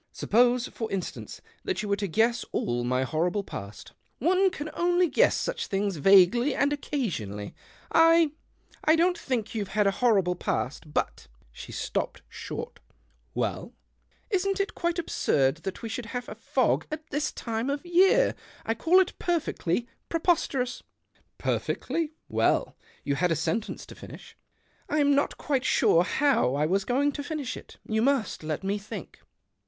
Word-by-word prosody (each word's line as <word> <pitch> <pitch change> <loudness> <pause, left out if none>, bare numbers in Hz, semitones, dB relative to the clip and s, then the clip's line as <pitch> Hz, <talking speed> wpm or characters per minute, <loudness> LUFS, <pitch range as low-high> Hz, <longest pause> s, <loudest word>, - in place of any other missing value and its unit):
Suppose, 245 +2 +2
for 225 -2 -5
instance, 195 -2 -5 0.2
that 380 - -2
you - - -3
were 200 - +3
to 200 0 -2
guess 230 +6 +2
all 120 0 -1
my 125 +2 +1
horrible 175 +9 0
past." 105 - -8
" - - -43
One 370 +7 +3
can 310 -4 -6
only 350 +1 +2
guess 470 - +3
such - - -2
things 195 -2 -1
vaguely 195 - +5
and 285 +1 +2
occasionally. 150 - -3 0.4
I 330 -1 +5 0.3
— - - -30
I 315 - +5
don't 350 +2 +3
think 245 -10 -3
you've 210 -3 -2
had 210 - +4
a 195 - +4
horrible 195 -5 +2
past, 150 -3 -3
but - - -2
" - - -31
she - - -10
stopped - - -3
short. 470 +1 -7 0.3
" - - -40
Well? - - -3 0.2
" - - -43
" - - -39
Isn't 390 0 +1
it 395 - -1
quite 345 0 -1
absurd 140 - +1
that 185 +6 -6
we 230 - -4
should 230 +1 -5
have 245 0 -5
a - - -6
fog - - 0
at 310 +1 -7
this 295 +1 -1
time 230 +2 -3
of 285 +4 -3
year? 380 +8 +4 0.3
I 225 - +1
call 335 +10 +4
it 375 - -1
perfectly 245 - -1 0.2
preposterous." 305 -7 0 0.3
" - - -49 0.2
Perfectly. 320 -2 -2
Well? - - +1 0.3
You 140 - 0
had 175 +5 +1
a - - +3
sentence 220 +8 -2
to - - -11
finish." - - -12 0.3
" - - -37
I'm 290 -1 +3
not 280 +1 +1
quite 270 -3 -1
sure 170 -8 +4
how 270 - +2
I 150 +2 +1
was 190 +4 +1
going 280 +4 +2
to 285 - -5
finish 290 -4 -4
it: - - -12
you 220 0 +1
must 270 -2 +1
let 155 +2 -3
me 200 +2 -1
think." 205 - -9
245 Hz, 175 wpm, -27 LUFS, 195-315 Hz, 0.4 s, vaguely